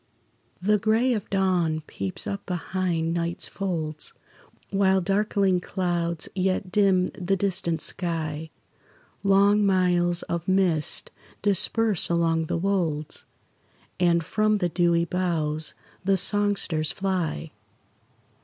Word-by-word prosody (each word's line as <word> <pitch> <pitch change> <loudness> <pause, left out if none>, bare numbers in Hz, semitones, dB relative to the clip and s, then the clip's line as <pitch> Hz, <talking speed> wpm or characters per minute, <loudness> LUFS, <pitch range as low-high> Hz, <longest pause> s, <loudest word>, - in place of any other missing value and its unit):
The 210 +3 +2
gray 225 +5 +2
of 210 -4 -4
dawn 180 -5 +1
peeps 95 -8 -5
up 200 0 -4
behind 175 -2 -1
night's 170 0 -2
folds, 160 -6 -3 0.6
While 195 -1 +3
darkling 195 0 +1
clouds 175 -3 -2
yet 185 0 -1
dim 190 -3 +3
the 185 +2 -1
distant 180 -4 +1
sky; 160 -3 -2 0.7
Long 200 +1 +4
miles 180 -3 +2
of 170 0 -4
mist 185 -5 +1 0.3
disperse 205 0 +2
along 165 -1 +1
the - - -1
wolds, 165 -5 -1 0.7
And 170 -1 +3
from 215 +2 +1
the 180 -3 0
dewy 170 -1 +2
boughs 160 -4 0 0.3
the 195 0 +2
songsters 195 -6 +1
fly. 175 - -2
180 Hz, 105 wpm, -25 LUFS, 165-195 Hz, 0.7 s, Long